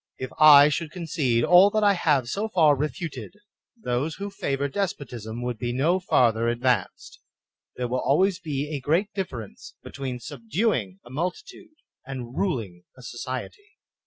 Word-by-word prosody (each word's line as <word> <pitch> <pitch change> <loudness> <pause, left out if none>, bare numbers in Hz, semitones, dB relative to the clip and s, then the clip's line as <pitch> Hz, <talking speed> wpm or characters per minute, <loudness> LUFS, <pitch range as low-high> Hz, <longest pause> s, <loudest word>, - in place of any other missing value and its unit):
If 130 -1 -6
I 150 -1 +9
should 155 +1 -2
concede 150 -8 -1
all 180 +6 +7
that 215 +1 0
I 205 -1 +5
have 150 -8 +1
so 205 - -2
far 160 -7 +4
refuted, 155 +6 -5 0.4
those 140 - -2
who 200 0 -6
favor 140 -7 -2
despotism 125 - -4
would 125 -2 -4
be 120 +1 -2
no 155 +9 +1
farther 115 -10 +2
advanced. 120 -3 -1 0.6
There 125 - -3
wUl 125 +2 -1
always 185 +8 +2
be 150 -4 -4
a - - -3
great 170 +10 0
difference 125 - -7
between 130 -2 -6
subduing 120 - -2
a 120 - -13
multitude 310 - -5 0.3
and 130 -2 -7
ruling 110 - -2
a 125 - -14
society. 130 - -7
140 Hz, 150 wpm, -25 LUFS, 120-180 Hz, 0.6 s, I